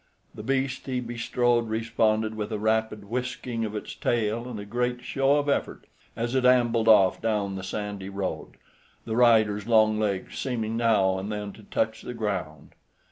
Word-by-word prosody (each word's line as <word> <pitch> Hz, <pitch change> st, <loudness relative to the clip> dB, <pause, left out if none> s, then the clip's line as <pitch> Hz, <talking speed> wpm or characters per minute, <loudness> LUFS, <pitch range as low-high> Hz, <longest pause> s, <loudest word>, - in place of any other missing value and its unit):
The -, -, -8 dB
beast 135 Hz, 0 st, -1 dB
he 130 Hz, -1 st, -1 dB
bestrode 120 Hz, -1 st, 0 dB
responded 110 Hz, -1 st, +1 dB
with 110 Hz, 0 st, -4 dB
a 110 Hz, -, -1 dB
rapid 110 Hz, 0 st, 0 dB
whisking 120 Hz, 0 st, -3 dB
of 105 Hz, 0 st, -5 dB
its 105 Hz, -, -5 dB
tail 115 Hz, +1 st, -1 dB
and 115 Hz, -4 st, -6 dB
a 100 Hz, -, -7 dB
great 125 Hz, +3 st, -2 dB
show 135 Hz, +1 st, +2 dB
of 145 Hz, 0 st, -1 dB
effort, 140 Hz, -, -1 dB, 0.3 s
as 120 Hz, +2 st, -2 dB
it 130 Hz, -1 st, +2 dB
ambled 120 Hz, -3 st, +3 dB
off 100 Hz, -4 st, +5 dB
down 105 Hz, -3 st, 0 dB
the 95 Hz, -, -5 dB
sandy 100 Hz, 0 st, -5 dB
road, 100 Hz, -1 st, -4 dB, 0.5 s
the 110 Hz, -, -3 dB
rider's 110 Hz, -4 st, +4 dB
long 110 Hz, -2 st, +4 dB
legs 100 Hz, -3 st, -2 dB
seeming 115 Hz, -4 st, -2 dB
now 105 Hz, -5 st, +2 dB
and 100 Hz, +3 st, -5 dB
then 105 Hz, -1 st, -4 dB
to -, -, -14 dB
touch 110 Hz, +1 st, -2 dB
the 125 Hz, -, -7 dB
ground. 100 Hz, -9 st, -4 dB
110 Hz, 175 wpm, -26 LUFS, 105-120 Hz, 0.5 s, off